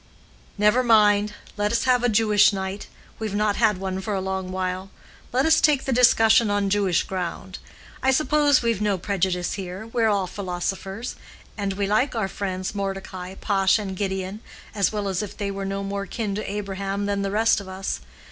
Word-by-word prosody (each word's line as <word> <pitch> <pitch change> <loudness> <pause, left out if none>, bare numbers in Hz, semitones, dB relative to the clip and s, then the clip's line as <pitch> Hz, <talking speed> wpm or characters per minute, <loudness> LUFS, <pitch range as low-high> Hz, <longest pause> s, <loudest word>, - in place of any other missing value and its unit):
"Never 210 +4 +4
mind. 210 -3 +4 0.2
Let 205 0 0
us 235 - +1
have 250 -2 +3
a 245 - +3
Jewish 210 -2 +4
night; 190 0 -4 0.3
we've 215 -2 -3
not 210 0 +1
had 215 -4 +3
one 190 0 -3
for 205 +1 -2
a - - 0
long 190 -1 -3
while. 185 +1 -3 0.4
Let 260 +3 +2
us 320 0 +5
take 290 -3 +3
the 270 - 0
discussion 225 -2 +5
on 205 -1 0
Jewish 195 -4 +2
ground. 185 0 -5 0.4
I 265 - +2
suppose 290 0 +3
we've 230 -3 0
no 205 -2 +1
prejudice 185 -1 -1
here; 190 +1 -6
we're 230 0 +1
all 200 -2 +1
philosophers; 195 +4 -4 0.4
and 200 -2 -2
we 200 +1 -1
like 220 +7 +1
our 220 -4 0
friends 190 -1 -4
Mordecai, 195 -2 -5
Pash, 195 -1 +2
and 195 -3 -4
Gideon, 190 +1 -3 0.3
as 200 -3 +1
well 210 -2 -2
as 190 -1 -1
if 205 -1 -7
they 200 -1 -2
were 195 0 -4
no 195 0 -3
more 200 0 -4
kin 215 -4 -3
to 205 0 -4
Abraham 200 0 -3
than 200 0 -1
the 200 - -1
rest 220 +1 +2
of 195 - -11
us. 190 +1 -4
200 Hz, 190 wpm, -24 LUFS, 190-215 Hz, 0.4 s, us